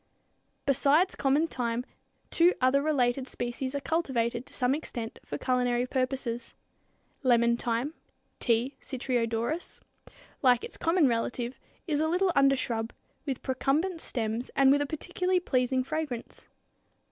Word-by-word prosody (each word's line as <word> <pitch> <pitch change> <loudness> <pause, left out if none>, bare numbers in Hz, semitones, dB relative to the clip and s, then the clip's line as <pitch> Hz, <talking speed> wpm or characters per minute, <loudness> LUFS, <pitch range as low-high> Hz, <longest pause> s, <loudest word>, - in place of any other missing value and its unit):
Besides 290 +6 +3
common 285 +3 +2
thyme 245 -5 -2 0.5
two 345 +2 +4
other 260 +2 +3
related 265 -3 +1
species 255 +2 -4
are - - 0
cultivated 260 -7 -1
to - - -12
some 250 +1 +2
extent 240 -6 -5
for - - -5
culinary 250 -1 +1
purposes. 255 -2 -2 0.7
Lemon 235 -3 +4
thyme 240 +5 -1 0.5
(T. 240 +3 +1
citriodorus, 245 +3 -2 0.3
Pers.), - - -18 0.3
like 250 -4 +4
its - - -7
common 330 -2 +3
relative, 240 +1 -2 0.3
is 300 -4 0
a 315 - +2
little 360 +3 +2
undershrub, 255 -5 +2 0.4
with 265 -2 -3
procumbent 305 +7 0
stems 230 0 -3
and 270 -1 +6
with 285 +1 +4
a 290 - -1
particularly 360 +4 -1
pleasing 255 -5 +1
fragrance. 290 -4 -5
260 Hz, 130 wpm, -29 LUFS, 240-295 Hz, 0.7 s, and